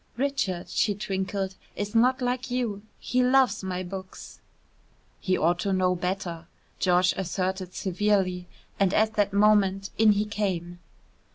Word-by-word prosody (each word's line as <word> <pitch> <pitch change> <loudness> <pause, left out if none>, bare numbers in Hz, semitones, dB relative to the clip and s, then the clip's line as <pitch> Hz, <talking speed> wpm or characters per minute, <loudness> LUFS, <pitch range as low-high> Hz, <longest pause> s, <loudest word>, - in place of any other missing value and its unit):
"Richard," 255 -10 -1
she 205 -2 +1
twinkled, 190 -1 -3 0.2
"is 205 +1 -4
not 250 +3 +3
like 250 +1 -1
you. 240 -5 -2 0.2
He 255 - 0
loves 255 -3 +3
my 185 -1 -3
books." 185 +1 -9 0.8
"He 185 -1 0
ought 175 +2 +2
to 195 - -1
know 185 -1 +2
better," 180 -2 -4 0.3
George 180 0 +3
asserted 185 0 -3
severely, 190 -2 0 0.3
and 195 -1 +2
at 220 0 +2
that 205 -1 +1
moment 200 -1 +3
in 220 -1 +6
he 205 +1 0
came. 180 -5 -3
195 Hz, 140 wpm, -26 LUFS, 185-210 Hz, 0.8 s, in